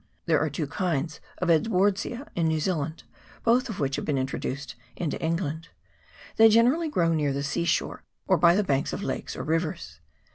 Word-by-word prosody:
There 160 -3 +3
are 155 - 0
two 150 +2 -3
kinds 155 -1 -2 0.2
of 180 - -1
Edwardsia 200 - +1
in 165 -2 +1
New 160 -1 +1
Zealand, 155 -1 -2 0.4
both 245 +2 +3
of 215 - -5
which 135 -2 0
have - - -3
been 145 -3 0
introduced 135 +1 -3 0.2
into 160 -4 -3
England: 165 -1 -2 0.7
they 225 0 +8
generally 250 +9 +4
grow 170 - +2
near 150 -3 +1
the 140 +1 -2
sea 140 +4 -1
shore, - - -1 0.2
or - - +3
by 170 0 +5
the 210 - +2
banks 140 -7 0
of - - -4
lakes - - -4
or - - -5
rivers. 155 - -2
165 Hz, 185 wpm, -26 LUFS, 150-195 Hz, 0.7 s, they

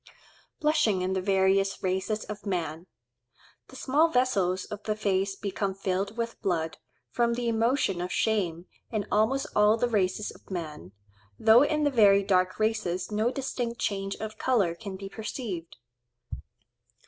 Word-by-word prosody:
Blushing 300 -12 +2
in 185 +1 0
the 190 - 0
various 195 +1 +2
races 190 +3 -1
of 210 -1 -7
man.—The 170 -2 -8
small 295 +5 +3
vessels 200 - +1
of 210 0 -7
the 215 0 -2
face 195 -2 0
become 195 -1 -3
filled 195 +2 -2
with 230 0 -4
blood, 165 -4 -1 0.3
from 235 - +1
the 240 0 -2
emotion 230 -4 +1
of 180 +1 -4
shame, 180 -6 0 0.2
in 215 -3 -2
almost 220 +6 +2
all 210 +1 +5
the 245 - +1
races 210 -2 0
of - - -18
man, 155 - -6 0.5
though 220 +2 +6
in 300 +1 +2
the 290 - +2
very 200 -5 +5
dark 185 -2 +2
races 215 -4 -1
no 215 +3 +1
distinct 245 -3 -3
change 195 -1 -2
of 215 0 -7
colour 210 -10 +2
can 195 +2 -8
be 195 +1 -7
perceived. 200 -5 -6
205 Hz, 150 wpm, -28 LUFS, 185-230 Hz, 0.5 s, though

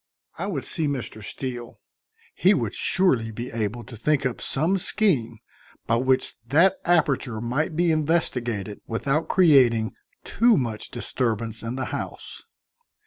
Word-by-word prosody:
I - - -2
would 155 -10 -3
see 160 -4 -2
Mr. 125 -6 -4
Steele; 120 +1 -6 0.5
he - - +4
would - - -2
surely 135 - +2
be 120 +3 -6
able 115 +1 -3
to 115 +2 -11
think 145 +5 0
up 125 - -2
some 170 +8 +1
scheme 135 - +1 0.5
by 115 - +2
which 130 +1 +1
that 175 +8 +4
aperture 140 -9 +1
might 135 +8 -1
be 170 0 +2
investigated 125 - -1
without 135 +7 -1
creating 130 - +4 0.3
too 230 -2 +3
much 115 -4 -3
disturbance 115 -2 -3
in 115 +2 -4
the 130 -1 -3
house. - - -6
130 Hz, 140 wpm, -24 LUFS, 115-160 Hz, 0.5 s, he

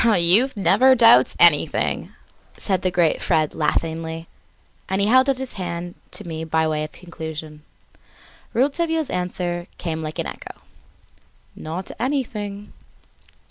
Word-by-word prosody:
"Youth 215 +4 +4
never 260 +6 +5
doubts 230 -1 +6
anything," - - +3 0.5
said 190 -3 0
the 185 - +1
great 175 -3 +1
Fred 155 -1 +1
laughingly, 160 +1 -2 0.6
and 190 +1 0
held 255 +7 +4
out 270 - +1
his 265 -1 -5
hand 175 0 -5 0.2
to 210 - -6
me 160 -1 -5
by 160 0 +1
way 155 -1 -1
of 155 - -6
conclusion. 160 -3 -8 0.9
Rouletabille's 320 +5 0
answer 175 -1 -3
came 160 -2 -4
like 155 0 -6
an - - -2
echo: - - -8 1.0
"Not 165 +4 -6
anything!" 215 -6 -3
180 Hz, 125 wpm, -22 LUFS, 160-230 Hz, 1.0 s, doubts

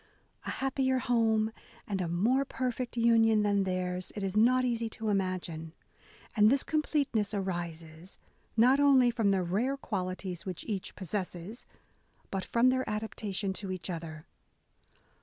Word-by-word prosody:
A - - -1
happier 265 -1 0
home 225 -3 +2 0.4
and 195 -2 -2
a 175 - -1
more 220 +11 +2
perfect 250 -2 -3
union 225 -2 +4
than 200 -1 +2
theirs, 185 -1 -2
it 205 - -4
is 195 0 -2
not 250 +4 +4
easy 230 -2 -1
to 220 0 -4
imagine: 185 -5 -2 0.6
and 210 -1 +6
this 270 +2 +3
com 310 -1 +1
pleteness 235 -9 0
arises, 170 -2 -5 0.4
not 255 +5 +5
only 270 -4 +5
from 225 -3 +1
the 190 -2 +2
rare 225 +11 0
qualities 185 -6 -4
which 185 -3 -6
each 200 -4 -4
possesses, 190 +2 -5 0.6
but 195 -1 -2
from 240 +2 +3
their 260 0 +1
adapta 215 -1 -3
tion 195 -1 0
to 190 0 -5
each 185 0 -4
other." 160 -2 -7
210 Hz, 150 wpm, -30 LUFS, 185-240 Hz, 0.6 s, and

